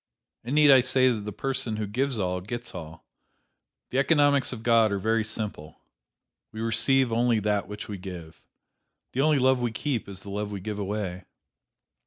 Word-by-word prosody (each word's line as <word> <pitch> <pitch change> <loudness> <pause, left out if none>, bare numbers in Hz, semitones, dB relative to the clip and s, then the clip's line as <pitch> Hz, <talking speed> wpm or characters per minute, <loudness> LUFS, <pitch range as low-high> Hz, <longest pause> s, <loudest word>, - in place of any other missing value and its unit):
And 125 +5 -3
need 150 -1 +7
I 130 -2 +8
say 130 0 +3
that 105 -4 -4
the 105 - -4
person 125 0 -2
who 105 0 -2
gives 125 +5 -1
all, 90 -2 -1
gets 120 +5 -6
all! 80 -2 -9 0.9
The 130 - +1
economics 145 -1 +3
of 115 -3 -7
God 115 -2 +4
are 100 - 0
very 110 +3 +1
simple: 105 -8 -4 0.7
We 110 - -9
receive 120 +3 +2
only 120 -1 +2
that 105 -1 0
which 105 +1 -7
we 100 -3 -6
give. 85 -5 -9 0.7
The 130 - 0
only 155 0 +3
love 130 -1 +3
we 120 -1 0
keep 120 -1 -3
is 95 -1 -8
the 100 - -8
love 105 +1 -3
we 100 - -4
give 105 +2 -5
away. 95 -2 -4
110 Hz, 185 wpm, -26 LUFS, 100-130 Hz, 0.9 s, I